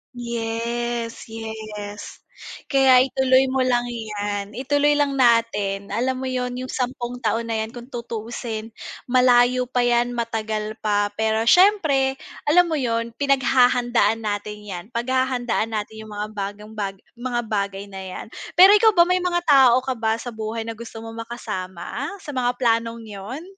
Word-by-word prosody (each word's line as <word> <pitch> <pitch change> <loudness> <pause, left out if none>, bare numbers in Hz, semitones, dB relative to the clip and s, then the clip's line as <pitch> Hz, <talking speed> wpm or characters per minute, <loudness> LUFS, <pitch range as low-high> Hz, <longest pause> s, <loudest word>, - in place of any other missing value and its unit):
Yes, 235 0 -3
yes. 215 -2 -7 0.5
Kaya 265 -2 +6
ituloy 265 0 +3
mo 265 - 0
lang 245 -1 +2
'yan, 205 -3 -4
ituloy 290 +3 +2
lang 290 -1 +1
natin. 210 -5 +2
Alam 255 +2 -1
mo - - -2
yun, 250 -1 -2
'yung 255 +1 -5
sampung 245 -1 -3
taon 225 0 0
na 225 -1 -2
'yan 220 - -4
kung 240 +2 -10
tutuusin, 230 -1 -5 0.3
malayo 250 0 +4
pa 250 -1 +1
'yan, 240 0 +2
matagal 220 -2 -3
pa, 205 -1 +1
pero 220 0 +1
siyempre, 290 - +4 0.3
alam 355 +4 +6
mo 310 - 0
yun, 230 -2 -1
pinaghahandaan 245 -5 +3
natin 210 0 -3
'yan. 180 -4 -6
Paghahandaan 245 -2 0
natin 215 +1 -4
'yung 215 0 -11
mga 210 +1 -3
bagang 205 +1 -6
baga 200 -2 -4 0.2
mga 240 0 -2
bagay 200 -2 -2
na 195 - -7
'yan. 190 -1 -7 0.3
Pero 375 +3 +9
ikaw 430 +1 +5
ba, 345 - +7
may 365 +1 +2
mga 350 -1 0
tao 265 -4 +6
ka 260 - -1
ba 225 -2 0
sa 245 +1 -6
buhay 220 +1 -4
na 230 - -4
gusto 225 -1 -9
mong 225 0 -8
makasama 190 +1 -5 0.2
sa 295 - -6
mga 250 -2 0
planong 230 -1 0
'yon? 215 +7 -8
235 Hz, 155 wpm, -22 LUFS, 220-255 Hz, 0.5 s, Pero